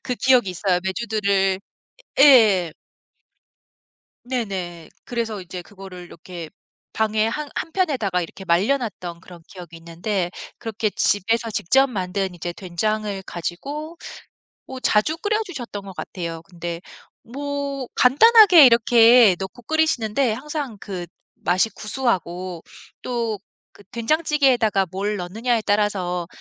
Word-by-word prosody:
그 250 - -2
기억이 250 -6 +3
있어요. 180 0 0
메주들을 195 -2 0 0.6
예. 215 - +6 1.5
네네. 190 -9 -4 0.2
그래서 230 -4 -3
이제 180 0 -8
그거를 190 -1 -11
이렇게 170 -1 -10 0.4
방에 220 0 +1
한 295 +6 -3
한편에다가 275 - -1
이렇게 175 +3 -8
말려 190 +10 +2
놨던 185 -9 -6
그런 175 -2 -14
기억이 175 -3 -11
있는데 175 +3 -3 0.3
그렇게 220 -1 -2
집에서 225 +4 0
직접 265 +8 +3
만든 190 -4 -3
이제 175 +1 -5
된장을 200 +3 -3
가지고 285 - -6 0.7
어 260 - -7
자주 255 +7 +1
끓여 425 +4 0
주셨던 240 - -7
것 195 -1 -10
같아요. 165 -3 -6
근데 170 -1 -7 0.4
뭐 280 +1 -4
간단하게 370 - +7
이렇게 235 -3 +6
넣고 190 +5 -7
끓이시는데 265 -6 +1
항상 275 -2 -5
그 185 -4 -6 0.3
맛이 185 +6 +1
구수하고 185 -7 -3 0.4
또 230 -4 -2 0.3
그 205 - -18
된장찌개에다가 245 - +2
뭘 200 +2 -2
넣느냐에 220 +6 -1
따라서 190 -4 0
210 Hz, 275 characters per minute, -22 LUFS, 180-250 Hz, 1.5 s, 간단하게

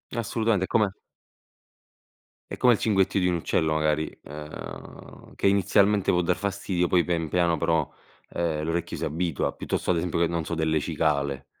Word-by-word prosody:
Assolutamente, 115 -3 0
è - - -40
come 105 -3 +1 1.5
è - - -4
come 125 -1 +5
il 110 - -1
cinguettio 95 -2 +2
di 90 - +2
un 90 - +1
uccello 80 -1 0
magari, 75 0 +1
ehm, 75 +1 -10
che - - +1
inizialmente 100 +1 +3
può 90 - +3
dar 90 +1 0
fastidio, 100 -3 -1
poi 90 -1 +3
pian 85 -2 -1
piano 85 +1 +1
però, 80 0 +1 0.4
ehm, 80 -3 -2
l'orecchio 80 +1 -2
si - - -5
abitua 85 -1 -1
piuttosto, - - -2
ad 90 - +1
esempio 85 0 -1
che, 85 - +3
non 85 -1 -2
so, 85 - -3
delle 80 -1 +1
cicale. 70 -3 -1
85 Hz, 170 wpm, -26 LUFS, 80-95 Hz, 1.5 s, come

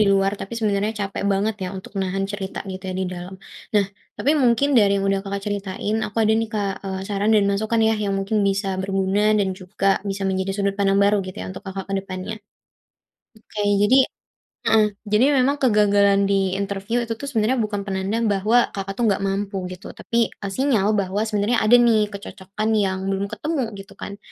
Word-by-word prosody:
di - - +6
luar, 195 0 +2
tapi 195 - -7
sebenarnya 210 -1 0
capek 195 - -5
banget 205 +3 0
ya 180 - -2
untuk 190 - -10
nahan 195 +1 -1
cerita 195 -2 -5
gitu 185 0 -7
ya - - -4
di - - 0
dalam. 180 +1 -7 0.4
Nah, 205 - +5 0.3
tapi 285 - +2
mungkin 245 +4 +3
dari 205 -2 +4
yang 195 - -1
udah 195 0 +1
Kakak 200 0 -4
ceritain, 205 +1 -2
aku 205 - -12
ada 215 0 +3
nih, 225 -1 -1
Kak, 205 -2 0
eee 190 -1 -3
saran, 205 +1 0
dan 210 -2 +4
masukan 215 +3 0
ya 225 - +3
yang 200 -1 0
mungkin 205 +2 0
bisa 195 0 -1
berguna 195 +1 0 0.2
dan 195 -2 +1
juga 190 +1 -4 0.2
bisa 195 0 -4
menjadi 190 0 -1
sudut 200 -1 0
pandang 195 0 +3
baru 200 +1 +4
gitu 185 - -8
ya, - - -5
untuk 190 - -9
Kakak 190 0 -5
ke - - 0
depannya. 190 +2 -5 1.0
Oke, 215 -1 -7 0.2
jadi 255 +6 +5 0.7
heeh, 220 -1 +5 0.2
jadi 215 +4 +4 0.2
memang 270 +3 +3
kegagalan 205 -3 +4
di 195 -2 +1
interview 200 +3 -2
itu 230 -1 -3
tuh 280 - -9
sebenarnya 230 +1 +1
bukan 205 -1 -3
penanda 195 +3 -1
bahwa 210 +4 +3
Kakak 195 0 -4
itu - - 0
nggak 195 -1 +1
mampu 195 0 -2
gitu, 185 0 -9
tapi, 235 - -2 0.2
eee, 200 - -6
sinyal 225 -7 +2
bahwa 195 +2 0
sebenarnya 215 +2 +1
ada 225 +3 +7
nih 220 -3 +3
kecocokan 200 +1 -5
yang 190 -3 +1
belum 195 +1 -1
ketemu, 285 +6 -2 0.2
gitu 195 0 -11
kan. 200 0 -8
200 Hz, 195 wpm, -22 LUFS, 195-215 Hz, 1.0 s, ada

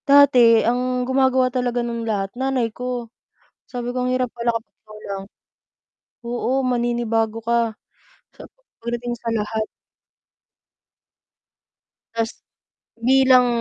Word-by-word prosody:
Dati, 255 -5 +7
ang 250 +1 0
gumagawa 260 -1 +2
talaga 245 -1 0
nun 235 -1 -3
lahat, 195 -2 -1
nanay 255 -3 -1
ko. 250 -1 -4 0.6
Sabi 245 -1 -5
ko, 250 0 -1
"Ang 250 - 0
hirap 255 0 +1
pala 235 0 +1
kapag 230 -1 -6
ikaw 215 0 -12
lang." 195 -1 -4 1.0
Oo, 245 +2 -1
maninibago 235 -3 0
ka. 230 0 +1 0.6
Sap - - -12 0.3
pagdating 240 +1 -3
sa 235 - -5
lahat. 215 0 -2 2.5
Tas, 230 0 -2 0.6
bilang 255 +1 +5
240 Hz, 110 wpm, -22 LUFS, 230-255 Hz, 2.5 s, Dati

